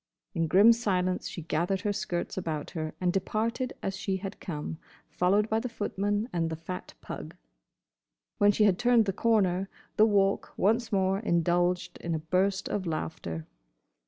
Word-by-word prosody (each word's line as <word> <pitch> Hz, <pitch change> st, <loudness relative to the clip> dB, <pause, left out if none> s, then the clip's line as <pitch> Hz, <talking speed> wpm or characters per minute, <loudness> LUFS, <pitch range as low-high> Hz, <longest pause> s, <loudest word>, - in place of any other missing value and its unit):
In 165 Hz, 0 st, 0 dB
grim 205 Hz, +8 st, +7 dB
silence 185 Hz, -5 st, 0 dB
she 170 Hz, -, -7 dB
gathered 175 Hz, +4 st, 0 dB
her 205 Hz, -, 0 dB
skirts 180 Hz, -4 st, -3 dB
about 160 Hz, -5 st, -3 dB
her 155 Hz, -3 st, -4 dB
and 180 Hz, -1 st, +1 dB
departed 225 Hz, +6 st, -1 dB
as 195 Hz, -, -2 dB
she 195 Hz, -1 st, -2 dB
had 195 Hz, +1 st, -7 dB
come, 160 Hz, -2 st, -5 dB, 0.3 s
followed 200 Hz, +4 st, +2 dB
by 220 Hz, 0 st, +1 dB
the 250 Hz, -, -4 dB
footman 205 Hz, 0 st, -1 dB
and 165 Hz, -2 st, 0 dB
the 160 Hz, -, -3 dB
fat 175 Hz, +3 st, -7 dB
pug. -, -, -7 dB, 1.0 s
When 205 Hz, 0 st, +6 dB
she 210 Hz, -, +2 dB
had 195 Hz, -4 st, +4 dB
turned 240 Hz, -2 st, +4 dB
the 195 Hz, -, -1 dB
corner 195 Hz, -4 st, +2 dB, 0.3 s
the 215 Hz, -, +7 dB
Walk 200 Hz, -2 st, +2 dB
once 225 Hz, +4 st, +2 dB
more 190 Hz, -1 st, +2 dB
indulged 175 Hz, -1 st, +1 dB
in 170 Hz, -1 st, -2 dB
a -, -, 0 dB
burst 185 Hz, +5 st, 0 dB
of 190 Hz, -3 st, -2 dB
laughter. 120 Hz, -, -4 dB
190 Hz, 165 wpm, -29 LUFS, 175-210 Hz, 1.0 s, grim